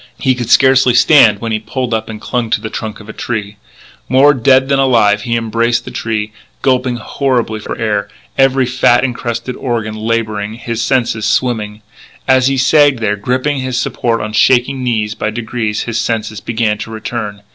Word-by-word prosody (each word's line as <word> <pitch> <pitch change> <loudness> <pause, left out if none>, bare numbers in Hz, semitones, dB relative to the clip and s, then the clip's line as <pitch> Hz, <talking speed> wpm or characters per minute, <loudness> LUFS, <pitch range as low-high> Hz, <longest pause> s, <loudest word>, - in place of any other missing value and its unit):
He 130 - +1
could 120 -2 -5
scarcely 130 -2 +4
stand 120 -5 +5
when 115 -1 -3
he 110 - 0
pulled 120 +3 -4
up 110 0 -2
and 110 -1 -7
clung 120 0 -2
to 110 - +1
the 110 0 -7
trunk 110 -2 -5
of 105 - -13
a 110 - -8
tree. 105 -3 -4 0.5
More 135 +3 +5
dead 130 +1 +3
than 140 0 +1
alive 115 -6 +3
he 115 +2 -2
embraced 115 +1 0
the - - -8
tree, 110 -1 -3 0.3
gulping 130 -2 +1
horribly 120 -3 -1
for - - -6
air, 105 -2 -1 0.3
every 135 -1 +3
fat 125 -1 +2
incrusted 125 0 -3
organ 115 -4 -3
labouring, 110 -1 -2
his 115 -1 -4
senses 120 -5 0
swimming. 105 -3 -1 0.4
As 130 -1 +4
he 135 0 +1
sagged 140 +1 +4
there, 110 -2 -1
gripping 130 +7 -1
his 130 -1 -3
support 115 -2 -1
on 110 0 -5
shaking 130 +3 +2
knees, 110 -4 -1
by 105 - -3
degrees 110 -1 -3
his 115 -1 -3
senses 110 -2 -3
began 110 -1 -1
to 105 - -6
return. 110 -2 -5
115 Hz, 180 wpm, -14 LUFS, 110-130 Hz, 0.5 s, stand